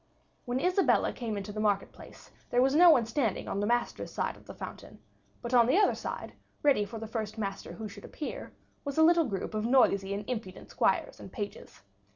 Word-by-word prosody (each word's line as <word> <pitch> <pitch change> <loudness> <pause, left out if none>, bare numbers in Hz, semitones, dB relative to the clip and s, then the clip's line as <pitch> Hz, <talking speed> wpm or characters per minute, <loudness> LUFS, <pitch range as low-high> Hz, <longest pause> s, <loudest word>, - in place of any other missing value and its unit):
When 245 +1 -1
Isabella 365 +5 +2
came 225 -4 -4
into 200 +1 -5
the 215 - -5
market 205 -2 +1
place, - - -14 0.2
there 245 - +2
was 270 +1 +2
no 345 +3 +8
one 255 -8 +5
standing 225 -3 -1
on 195 - -2
the 205 - 0
masters' 240 +1 -1
side - - -2
of - - -19
the - - -8
fountain, - - -9 0.5
but 240 +1 -4
on 240 -2 +6
the 265 - +3
other 410 -1 +4
side, - - -6 0.3
ready 270 -8 +4
for 225 +2 -8
the 225 - -6
first 220 -1 -4
master 195 -2 -4
who 220 -1 -6
should 205 0 -12
appear, 300 - -6 0.3
was 280 0 -5
a 320 - +6
little 335 0 +5
group 200 -5 -4
of 215 0 -1
noisy 200 -6 +3
and 205 0 -6
impudent 215 -7 -6
squires - - 0
and - - -10
pages. 205 - -7
230 Hz, 210 wpm, -30 LUFS, 205-270 Hz, 0.5 s, no